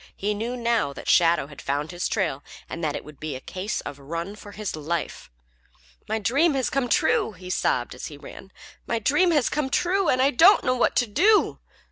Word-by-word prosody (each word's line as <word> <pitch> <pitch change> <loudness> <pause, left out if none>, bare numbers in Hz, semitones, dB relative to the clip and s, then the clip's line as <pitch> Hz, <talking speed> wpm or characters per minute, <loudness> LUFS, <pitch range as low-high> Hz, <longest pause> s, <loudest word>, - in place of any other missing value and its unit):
He 210 +2 -1
knew 230 +4 -4
now 230 -12 0
that - - -10
Shadow 170 -4 +4
had 145 0 -12
found 145 +3 -2
his 175 0 -2
trail 135 +2 -1 0.2
and 170 - -6
that 150 -2 -1
it - - -5
was 150 - -12
to 140 - -28
be 155 -3 -4
a - - -6
case 190 +9 -4
of 145 -1 -8
run 170 +7 -5
for 205 -1 -12
his 210 -5 -4
life. 155 - -4 0.8
"My 220 - 0
dream 275 - +2
has 260 -2 0
come 270 -3 0
true!" 220 - +2
he 180 0 -8
sobbed 120 -8 0
as 125 - -7
he 145 - -10
ran. 190 +6 -12 0.4
"My 230 - 0
dream 295 - +3
has 295 -7 +2
come 295 -2 -1
true, 365 +5 +1
and 255 - +2
I 270 +2 +4
don't 345 - +6
know 255 - +2
what 250 - +1
to 245 - +3
do!" 395 - +3
205 Hz, 220 wpm, -24 LUFS, 155-260 Hz, 0.8 s, don't